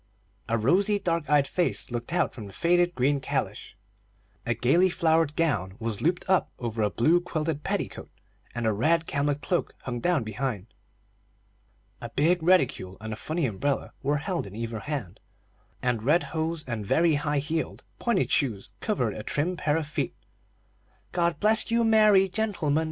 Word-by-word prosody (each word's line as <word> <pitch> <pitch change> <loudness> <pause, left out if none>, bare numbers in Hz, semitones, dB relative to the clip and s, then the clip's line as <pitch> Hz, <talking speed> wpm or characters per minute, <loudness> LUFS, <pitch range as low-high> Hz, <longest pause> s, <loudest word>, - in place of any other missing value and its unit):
A 115 - +2
rosy, 190 - +3
dark 170 -6 -1
eyed 145 -2 +4
face 175 -4 0
looked 120 +3 -4
out 175 - +1
from 110 -6 -8
the 100 - -12
faded 175 +1 +2
green 140 +3 +2
calash, - - -3 0.7
a 120 - +1
gayly 165 +11 +3
flowered 160 -3 +2
gown 95 - 0
was 110 -3 -3
looped 175 +3 0
up 190 0 +2
over 115 -2 -3
a 105 - +2
blue 160 - +3
quilted 155 -3 -3
petticoat, - - -3 0.5
and 120 -1 -2
a 110 - +2
red 160 +10 +2
camlet 145 0 -1
cloak 175 - -1
hung 120 -2 -4
down 170 -1 +1
behind. 110 -1 -4 1.3
A - - -6
big 170 +4 +2
reticule 160 - +2
and 110 +1 -5
a - - -4
funny 155 +7 -2
umbrella 130 +5 -2
were 145 +2 +1
held 165 - -3
in 100 - -10
either 115 0 -4
hand, 110 - -5 0.6
and 125 -3 0
red 150 +8 +3
hose 160 0 -1
and 115 -4 -4
very 165 +10 +3
high 145 0 0
heeled, 155 +3 -2 0.2
pointed 235 -6 +1
shoes 125 -11 0
covered 125 - -1
a - - -6
trim 150 +10 -1
pair 150 -2 0
of 160 - -2
feet. 150 - -3 1.0
"God 170 -3 0
bless 220 +2 +3
you, 230 0 +2
merry 215 -3 +5
gentlemen! 185 -7 0
150 Hz, 170 wpm, -27 LUFS, 120-175 Hz, 1.3 s, merry